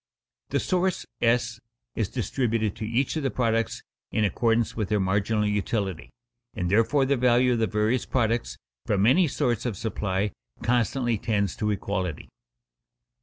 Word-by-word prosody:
The -, -, +1 dB
source 185 Hz, 0 st, 0 dB, 0.2 s
(S) 115 Hz, -1 st, +2 dB, 0.4 s
is 110 Hz, -4 st, -1 dB
distributed 115 Hz, -4 st, -1 dB
to 110 Hz, -, -4 dB
each 125 Hz, +7 st, 0 dB
of -, -, -1 dB
the 135 Hz, -, 0 dB
products 115 Hz, -3 st, 0 dB, 0.3 s
in 110 Hz, -, +1 dB
accordance 115 Hz, +2 st, +1 dB
with 105 Hz, -4 st, -2 dB
their 105 Hz, -, +2 dB
marginal 100 Hz, +3 st, +1 dB
utility, 105 Hz, -3 st, -1 dB, 0.5 s
and 90 Hz, 0 st, -2 dB
therefore 115 Hz, +6 st, +3 dB
the 140 Hz, +1 st, +2 dB
value 125 Hz, 0 st, +3 dB
of 120 Hz, -, 0 dB
the 110 Hz, -, +2 dB
various 105 Hz, +5 st, 0 dB
products 115 Hz, -, 0 dB, 0.3 s
from 100 Hz, 0 st, +2 dB
any 165 Hz, +9 st, +5 dB
source 120 Hz, -4 st, 0 dB
of 115 Hz, -6 st, -3 dB
supply 105 Hz, -2 st, -1 dB, 0.3 s
constantly 120 Hz, 0 st, +1 dB
tends 100 Hz, -5 st, 0 dB
to 105 Hz, -, 0 dB
equality. 95 Hz, -5 st, -3 dB
115 Hz, 150 wpm, -26 LUFS, 105-120 Hz, 0.5 s, any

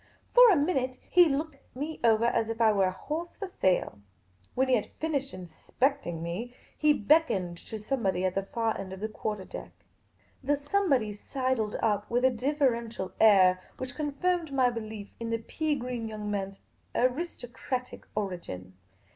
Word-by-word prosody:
For -, -, +9 dB
a 395 Hz, -, +6 dB
minute 270 Hz, -5 st, 0 dB
he 355 Hz, -1 st, +8 dB
looked 295 Hz, +1 st, -2 dB, 0.2 s
me 300 Hz, +4 st, -4 dB
over 225 Hz, 0 st, +4 dB
as 225 Hz, -1 st, +1 dB
if 225 Hz, 0 st, -4 dB
I 225 Hz, -2 st, +5 dB
were 195 Hz, -2 st, +3 dB
a -, -, 0 dB
horsii 310 Hz, -, -5 dB
for 405 Hz, -, -4 dB
sale. 185 Hz, -, 0 dB, 0.6 s
When 265 Hz, +1 st, +2 dB
he 260 Hz, -, +2 dB
had 220 Hz, -4 st, +1 dB
finished 285 Hz, -4 st, -1 dB
in 185 Hz, -1 st, -8 dB
specting 175 Hz, -, -1 dB
me, 220 Hz, +9 st, -5 dB, 0.2 s
he 305 Hz, -1 st, +4 dB
beckoned 205 Hz, -, +2 dB
to 220 Hz, -, -5 dB
somebody 205 Hz, -5 st, -1 dB
at 185 Hz, -, +1 dB
the 195 Hz, -, 0 dB
far 225 Hz, +3 st, -1 dB
end 190 Hz, -1 st, -6 dB
of 190 Hz, -, -8 dB
the 215 Hz, -, -2 dB
quarter 215 Hz, -2 st, -4 dB
deck. -, -, -8 dB, 0.7 s
The 285 Hz, +2 st, +2 dB
somebody 285 Hz, -, +1 dB
sidled 255 Hz, 0 st, -2 dB
up 210 Hz, -1 st, +1 dB
with 245 Hz, +2 st, +2 dB
a 260 Hz, -, +5 dB
deferential 240 Hz, -6 st, 0 dB
air 185 Hz, -4 st, +6 dB, 0.2 s
which 255 Hz, -1 st, -5 dB
con 300 Hz, -1 st, -2 dB
firmed 350 Hz, 0 st, 0 dB
my 260 Hz, -2 st, +3 dB
belief 215 Hz, -3 st, -7 dB
in 230 Hz, -1 st, -4 dB
the 230 Hz, -, +1 dB
pea 305 Hz, +6 st, -2 dB
green 245 Hz, -3 st, -4 dB
young 210 Hz, -1 st, -5 dB
man's 195 Hz, -1 st, -4 dB, 0.3 s
aristocratic 255 Hz, -2 st, -2 dB
origin. 170 Hz, -, -5 dB
235 Hz, 170 wpm, -29 LUFS, 205-280 Hz, 0.7 s, For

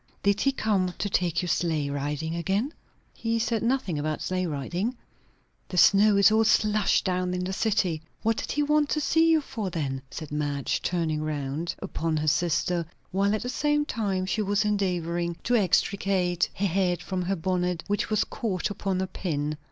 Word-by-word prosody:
_ -, -, -40 dB
Did 200 Hz, 0 st, +2 dB
he 275 Hz, -, +3 dB
come 195 Hz, -8 st, 0 dB
to 205 Hz, -, -2 dB
take 175 Hz, -2 st, +1 dB
you -, -, -2 dB
sleigh 160 Hz, -4 st, 0 dB
riding 145 Hz, +3 st, -2 dB
again?" 200 Hz, -, -1 dB, 0.4 s
"He 230 Hz, 0 st, -1 dB
said 225 Hz, 0 st, 0 dB
nothing 230 Hz, -, 0 dB
about 155 Hz, +1 st, -2 dB
sleigh 185 Hz, -1 st, -1 dB
riding." 175 Hz, -, -2 dB, 0.7 s
"The 180 Hz, -, -5 dB
snow 200 Hz, +3 st, +6 dB
is 200 Hz, +2 st, +6 dB
all 220 Hz, +1 st, +4 dB
slush 215 Hz, -1 st, +3 dB
down 180 Hz, -1 st, -1 dB
in 180 Hz, -, -2 dB
the 190 Hz, +1 st, -3 dB
city. 190 Hz, -7 st, 0 dB, 0.2 s
What 225 Hz, 0 st, +2 dB
did -, -, -3 dB
he 295 Hz, -, +1 dB
want 300 Hz, 0 st, +2 dB
to 305 Hz, -, +1 dB
see 325 Hz, +2 st, +3 dB
you 320 Hz, -1 st, +4 dB
for, 220 Hz, -8 st, -4 dB
then?" 140 Hz, -6 st, -3 dB
said 155 Hz, +1 st, -7 dB
Madge, 145 Hz, -2 st, -1 dB
turning 160 Hz, -3 st, -1 dB
round 155 Hz, +2 st, -3 dB
upon 160 Hz, -1 st, -2 dB
her 155 Hz, 0 st, -1 dB
sister, 170 Hz, +2 st, +1 dB, 0.3 s
while 200 Hz, +2 st, +2 dB
at 215 Hz, -, -3 dB
the -, -, -4 dB
same 295 Hz, +2 st, +1 dB
time 195 Hz, -8 st, -1 dB
she 200 Hz, +4 st, -1 dB
was 205 Hz, +1 st, +1 dB
endeavouring 175 Hz, -4 st, -1 dB
to 245 Hz, -, +2 dB
extricate 190 Hz, -3 st, +1 dB
her 200 Hz, -, -1 dB
head 180 Hz, -1 st, +1 dB
from 185 Hz, -1 st, -2 dB
her 185 Hz, +2 st, 0 dB
bonnet, 180 Hz, 0 st, -1 dB
which 205 Hz, 0 st, -1 dB
was 215 Hz, -1 st, +2 dB
caught 210 Hz, -6 st, -3 dB
upon 195 Hz, -2 st, -2 dB
a -, -, 0 dB
pin. 155 Hz, -5 st, -2 dB
185 Hz, 190 wpm, -27 LUFS, 170-215 Hz, 0.7 s, snow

